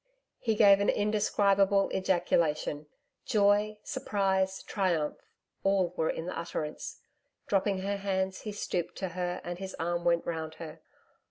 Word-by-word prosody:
He 225 -2 0
gave 200 -2 +7
an 200 - +2
indescribable 200 -1 +2
ejaculation 170 -5 +1 0.4
joy, 210 0 +3
surprise, 195 -7 0
triumph 175 -7 -1 0.4
all 195 -3 +2
were 160 - 0
in 165 - -3
the 180 - -4
utterance. 155 -2 -5 0.4
Dropping 195 -1 +1
her 200 +1 -1
hands, 190 -1 -1
he 215 - -5
stooped 180 -4 -3
to 190 - -3
her 180 0 -3
and 175 0 -5
his 190 -1 -6
arm 175 +1 -1
went 170 -1 +2
round 160 -1 -4
her. 160 -1 -9
190 Hz, 140 wpm, -30 LUFS, 170-200 Hz, 0.4 s, gave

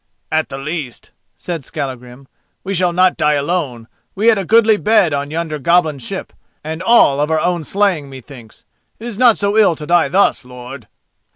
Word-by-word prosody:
"At 155 0 0
the 135 - -6
least," 140 -3 -6 0.3
said 170 -5 -6
Skallagrim, 130 0 -7 0.4
"we 195 - -4
shall 180 -1 +1
not 185 +1 +2
die 150 0 +2
alone: 145 -6 -2 0.3
we 215 +4 +3
had 220 -3 +3
a 195 - -4
goodly 220 +1 +4
bed 210 -7 +2
on 140 0 -3
yonder 160 -1 -4
goblin 160 -1 +1
ship, 120 - -7 0.3
and 160 +2 -6
all 185 -9 +4
of 150 - 0
our 160 -1 +1
own 175 0 -1
slaying 185 -5 -1
methinks. 130 -3 -13 0.3
It 225 - -11
is 235 -3 -6
not 245 -3 +5
so 200 0 -1
ill 200 -6 +4
to 150 - -8
die 175 +2 +2
thus, 195 -5 +2
lord!" 125 0 -11
160 Hz, 185 wpm, -16 LUFS, 140-190 Hz, 0.4 s, not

